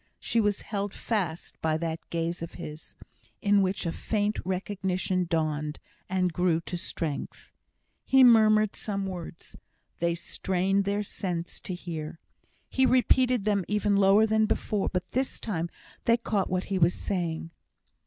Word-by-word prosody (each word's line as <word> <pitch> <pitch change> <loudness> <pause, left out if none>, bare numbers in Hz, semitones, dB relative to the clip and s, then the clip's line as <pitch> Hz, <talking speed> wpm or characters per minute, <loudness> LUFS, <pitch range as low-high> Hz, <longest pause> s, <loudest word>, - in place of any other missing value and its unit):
She 230 - +1
was 205 -1 +1
held 200 -2 -3
fast 180 -8 -3
by 160 -1 +1
that 165 0 -3
gaze 170 +1 -2
of 165 - -6
his, 150 +1 -9 0.4
in 205 0 +4
which 190 0 0
a 165 - 0
faint 210 +3 -1
recognition 185 -1 -1
dawned, 155 -2 -1 0.3
and 185 -2 +1
grew 175 -1 +2
to 175 - -5
strength. 165 -4 -4 0.5
He 265 0 +5
murmured 215 -3 +6
some 200 -2 -3
words. 175 -3 -7 0.4
They 170 0 +1
strained 190 +3 0
their 200 +1 0
sense 175 -4 -4
to 185 - -5
hear. 165 -3 -6 0.5
He 265 0 +3
repeated 255 -2 +3
them 205 -3 +2
even 210 -1 +1
lower 200 +2 +6
than 220 0 +2
before; 210 -2 0
but 180 -1 -3
this 260 +1 -1
time 170 -6 -2 0.4
they 230 0 +5
caught 210 -5 -1
what 185 0 0
he 195 -2 -2
was 170 +1 +4
saying. 165 -4 -2
190 Hz, 150 wpm, -28 LUFS, 170-210 Hz, 0.5 s, murmured